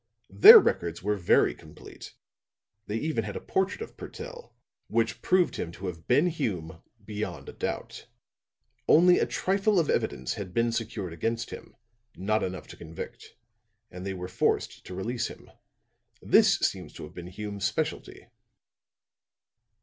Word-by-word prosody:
Their 450 +4 +11
records 85 - +1
were 105 +1 +1
very 90 -4 +3
complete. - - -13 0.7
They 105 - -2
even 150 -3 -1
had 105 -1 -6
a - - -3
portrait 190 - -1
of 450 - -8
Purtell, 480 +1 -9 0.3
which 115 0 0
proved 185 -1 +2
him 85 - -4
to 95 - -9
have 85 -3 -6
been 140 +7 +4
Hume 95 - -3 0.2
beyond 105 0 -5
a - - -8
doubt. - - -5 0.8
Only 180 +3 +6
a - - +1
trifle 195 +1 +1
of 160 - +1
evidence 65 0 -1
had 95 -3 -7
been 115 0 +2
secured 105 -6 -4
against 115 +7 -3
him - - -10 0.4
not 110 +4 0
enough 95 0 -4
to - - -11
convict 80 0 -9 0.6
and 90 0 -8
they 95 0 -4
were 90 0 -6
forced 90 - -1
to 90 - -7
release 115 +6 -2
him. - - -13 0.7
This - - +4
seems - - -2
to - - -9
have 75 - -10
been 90 -1 -8
Hume's 100 +1 -5
specialty. - - -3
105 Hz, 150 wpm, -28 LUFS, -, 0.8 s, Their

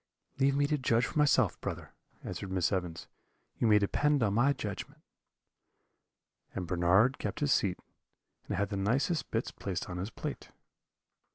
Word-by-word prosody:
"'Leave 135 0 +3
me 145 0 +3
to 150 0 0
judge 120 -2 +2
for 150 - -3
myself, 130 - +3
brother,' - - -5 0.3
answered 100 - -5
Miss 90 -2 +1
Evans; 90 -4 -3 0.5
'you 115 - +2
may 105 -1 +6
depend 140 +7 +2
on 100 -2 +1
my 120 +6 +4
judgment.' 105 -8 -6 1.5
"And 90 - -3
Bernard 90 +9 +3
kept - - -3
his 145 -2 +1
seat, 95 -7 +2 0.7
and - - -2
had 100 +1 0
the 100 - -3
nicest 135 - 0
bits 115 +1 -2
placed 95 -2 -4
on 90 - -5
his 95 +4 -3
plate. - - -6
110 Hz, 160 wpm, -31 LUFS, 95-135 Hz, 1.5 s, may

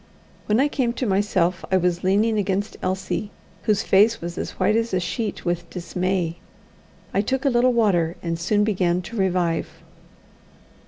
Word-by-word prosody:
When 215 +2 +3
I 280 - +4
came 255 -5 -1
to 255 - -3
myself 190 -3 +1
I 190 - +5
was 180 -1 0
leaning 210 +4 +2
against 200 +1 -1
Elsie, 190 +2 -2 0.4
whose 215 0 +2
face 210 +4 +4
was 170 0 -6
as - - -5
white 215 - +3
as 230 -3 0
a - - +2
sheet 205 +4 -3
with 175 -1 -2
dismay. 180 -1 -2 0.8
I 200 - +3
took 265 +6 -2
a 275 - +4
little 245 +1 +4
water 185 -8 +2
and 165 -1 -2
soon 205 +4 +2
began 180 -4 +1
to 215 +7 -8
revive. 180 -4 0
190 Hz, 165 wpm, -23 LUFS, 175-220 Hz, 0.8 s, I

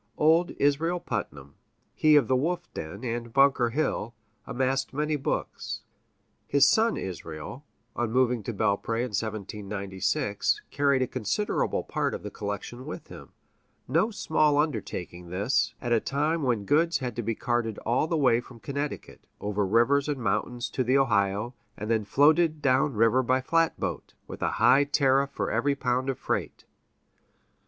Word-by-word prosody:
Old 165 +3 +4
Israel 160 +5 +1
Putnam, 70 - -5 0.4
he 155 -1 +4
of 140 -6 +5
the 130 - +2
wolf 175 +6 -2
den 90 +8 -7
and 120 -1 -3
Bunker 135 -2 +4
Hill, 120 -4 -2 0.3
amassed 135 +1 -1
many 150 +1 0
books. 135 - -3 0.6
His 140 0 +5
son 225 +7 +3
Israel, 85 - -7 0.3
on 120 -2 -1
moving 125 -1 +2
to - - -2
Belpré 110 +2 0
in 125 -3 -4
1796, 100 +2 -2
carried 140 -2 +2
a - - -2
considerable 130 - -1
part - - -2
of - - -8
the - - -6
collection 105 +6 -6
with 155 - -8
him - - -12 0.5
no 165 - +2
small 155 -8 +1
undertaking 95 - -3
this, 100 +10 0
at 120 - -4
a 115 - +4
time 150 +7 -1
when 120 -7 0
goods 165 - +3
had 125 -4 -4
to 120 - -2
be 115 0 -2
carted 120 -3 -1
all 120 +7 +1
the 165 - 0
way 125 -5 +3
from 120 -1 -14
Connecticut, 140 +3 -5
over 105 0 -1
rivers 135 +8 +3
and 145 - -1
mountains 120 +3 -2
to 130 - 0
the 130 +3 +3
Ohio, 105 -2 +1 0.2
and 105 +2 -4
then 110 -2 +1
floated 155 +6 +3
down 135 0 +2
river 115 +4 +4
by 130 +1 +2
flatboat, 165 +5 -1
with - - -9
a - - 0
high 135 +3 +5
tariff 140 -1 +2
for 140 - -3
every 140 0 +1
pound 130 0 -1
of 135 - -2
freight. - - -3
130 Hz, 160 wpm, -27 LUFS, 110-145 Hz, 0.6 s, of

